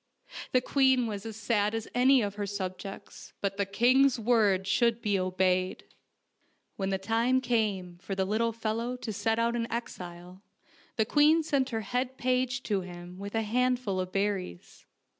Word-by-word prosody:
The 255 - +3
queen 260 -2 +3
was 210 -1 -5
as 220 - -7
sad 210 -1 0
as 225 -1 -4
any 255 0 +5
of 200 -1 -2
her 205 -1 -4
subjects, 195 0 -7
but 195 -1 -2
the 200 -1 0
king's 250 +5 +4
word 210 -5 +3
should 230 +4 +2
be 205 -4 0
obeyed. 185 0 0 0.9
When 195 -1 -2
the 195 - 0
time 230 +6 +1
came 205 -8 -1
for 195 +1 -5
the 190 0 0
little 225 +4 +1
fellow 230 +2 -2
to 225 -3 -5
set 225 +3 0
out 230 +1 +1
into 230 -1 -2
exile 180 -5 -7 0.5
the 220 - +2
queen 305 +6 +4
sent 280 -4 0
her 225 -2 -2
head 250 +5 -2
page 255 0 0
to 200 -3 0
him 175 0 -10
with 200 +2 -6
a 225 - +1
handful 245 -3 0
of 185 0 -3
berries. 195 - -3
220 Hz, 170 wpm, -29 LUFS, 195-245 Hz, 0.9 s, any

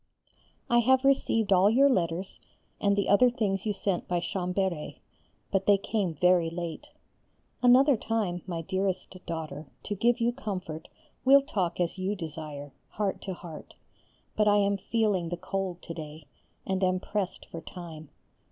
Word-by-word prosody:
I 240 - +4
have 260 +3 +4
received 225 -6 +3
all 190 +2 +5
your 265 +6 +5
letters 180 -6 -1 0.4
and 200 0 +2
the 200 -1 0
other 245 +5 +6
things 205 -4 -1
you 210 - +1
sent 195 -2 -2
by 175 -1 0
Chambéry, 180 -2 -2 0.5
but 195 -1 0
they 205 -1 +6
came 195 -4 -2
very 180 +1 +3
late. 170 - -6 0.7
Another 255 +3 +6
time, 210 -6 -2
my 170 -2 -3
dearest 190 +1 -2
daughter, 155 -3 -5 0.2
to 205 - -3
give 235 +4 +2
you 235 +1 +1
comfort 185 -10 -5 0.4
we'll 275 +1 +7
talk 190 - -2
as 175 +2 -1
you 190 +3 -1
desire, 150 -4 -7 0.2
heart 200 -2 -2
to 190 -2 -5
heart, 165 -3 -10 0.6
but 210 0 +2
I 205 0 +5
am 200 0 +2
feeling 200 -4 0
the 175 - -3
cold 185 -1 -4
to 165 - -6
day, 155 -1 -9 0.4
and 190 0 -1
am 185 0 +2
pressed 200 -1 -3
for 165 - -8
time. 160 -4 -9
190 Hz, 160 wpm, -28 LUFS, 170-210 Hz, 0.7 s, we'll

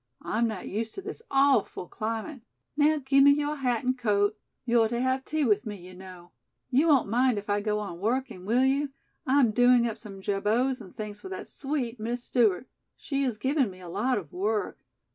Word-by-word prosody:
I'm 230 +2 0
not 215 -4 -5
used 220 +3 -3
to 390 - -5
this 420 +2 -7
awful 270 -9 +2
climate. 225 +5 -4 0.3
Now, 305 +1 +3
give 275 0 +5
me 285 0 +8
your 295 +1 -1
hat 250 -4 0
and 255 0 +1
coat. 210 -4 +1 0.3
You're 235 -2 +3
to 235 +1 -2
have 260 +1 0
tea 310 +1 -1
with 210 -2 +2
me, 210 - -4
you 185 -1 -12
know. 180 -1 -12 0.4
You 280 +6 +3
won't 280 -8 +4
mind 245 +2 +2
if 205 +1 -4
I 205 0 +1
go 210 0 0
on 200 -5 -5
working, 230 -2 -2
will 240 +6 +2
you? 280 +2 +1 0.4
I'm 260 -3 +4
doing 245 +1 +5
up 225 - -5
some 200 -3 -10
jabots 220 +7 0
and 190 -4 -13
things 210 -1 -6
for 380 - -8
that 380 - -6
sweet 265 -5 -3
Miss 240 +3 -3
Stewart. 235 -3 +1 0.3
She 275 -2 -3
has 250 -5 -1
given 265 +2 +1
me 185 -1 -12
a 180 -2 -10
lot 215 +8 0
of 170 -8 -7
work. 210 +3 -1
235 Hz, 205 wpm, -27 LUFS, 205-265 Hz, 0.4 s, me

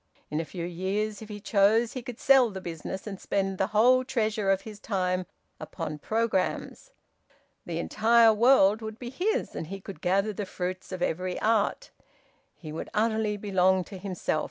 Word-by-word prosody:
In 150 - -1
a 165 - -2
few 170 +1 -6
years, 195 +4 -2
if 220 - -10
he 205 -1 -6
chose, 215 +3 +3
he 255 - -4
could 245 -1 -8
sell 265 -3 +5
the 195 -2 -6
business 175 +1 -6
and 195 -3 -7
spend 195 -1 -1
the 190 - +2
whole 240 +5 +4
treasure 215 -5 -1
of 195 0 +3
his 210 -1 -10
time 185 -3 -1 0.3
upon 155 -3 -6
programmes. 225 - -1 0.8
The - - -3
entire 225 +1 +4
world 220 -2 +5
would 220 0 -6
be 240 0 -7
his, 420 - -1
and 160 - -4
he 195 +3 -6
could 195 0 -10
gather 195 +4 +1
the 205 0 -4
fruits 185 +1 -5
of 185 -1 -3
every 180 +2 -2
art. 225 - +1 0.6
He 155 -3 -9
would 155 - -6
utterly 220 -1 +1
belong 190 -2 +2
to 190 +1 -10
himself. 185 -4 -2
205 Hz, 180 wpm, -27 LUFS, 185-220 Hz, 0.8 s, sell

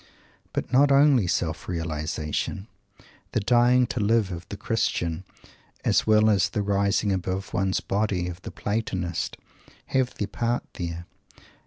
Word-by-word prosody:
But - - -4
not 140 +2 +5
only 140 -7 +5
self 85 -2 -1
realization. 80 +2 -3 0.7
The - - +2
"dying 120 +3 +4
to 125 - -2
live" 105 -1 +2
of 85 0 -7
the 100 - -6
Christian, 95 -5 -1 0.6
as - - +2
well 110 0 +5
as 100 -4 +3
"the 105 - -2
rising 100 +1 +1
above 95 +1 -3
one's 95 -1 0
body" 100 -3 -1
of 90 0 -7
the - - -7
Platonist, 95 -5 -3 0.5
have 130 -2 +1
their 105 - -2
part 120 +3 -1
there. 85 -1 -5
100 Hz, 140 wpm, -25 LUFS, 90-115 Hz, 0.7 s, not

